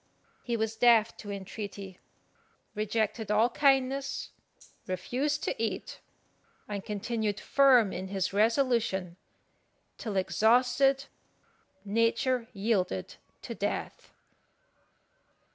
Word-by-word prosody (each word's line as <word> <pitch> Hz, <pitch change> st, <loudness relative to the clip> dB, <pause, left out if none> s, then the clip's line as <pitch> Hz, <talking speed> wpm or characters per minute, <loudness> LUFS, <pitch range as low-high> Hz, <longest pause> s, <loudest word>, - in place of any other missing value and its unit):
He 235 Hz, -1 st, -2 dB
was 220 Hz, 0 st, -1 dB
deaf 230 Hz, -1 st, +4 dB
to 205 Hz, -, -9 dB
entreaty, 200 Hz, -1 st, -7 dB, 0.7 s
rejected 215 Hz, +1 st, -1 dB
all 220 Hz, +3 st, +3 dB
kindness, 275 Hz, 0 st, +1 dB, 0.6 s
refused 255 Hz, +11 st, -2 dB
to -, -, 0 dB
eat, 225 Hz, -, -3 dB, 0.7 s
and 200 Hz, -2 st, -4 dB
continued 210 Hz, 0 st, -2 dB
firm 255 Hz, -7 st, +4 dB
in 185 Hz, +1 st, -5 dB
his 190 Hz, -1 st, -2 dB
resolution, 220 Hz, -5 st, +1 dB, 0.8 s
till 210 Hz, -4 st, -3 dB
exhausted 250 Hz, +7 st, +3 dB, 0.8 s
nature 230 Hz, +3 st, +1 dB
yielded 195 Hz, -, -1 dB, 0.3 s
to -, -, -5 dB
death. -, -, -4 dB
220 Hz, 90 wpm, -29 LUFS, 200-245 Hz, 0.8 s, deaf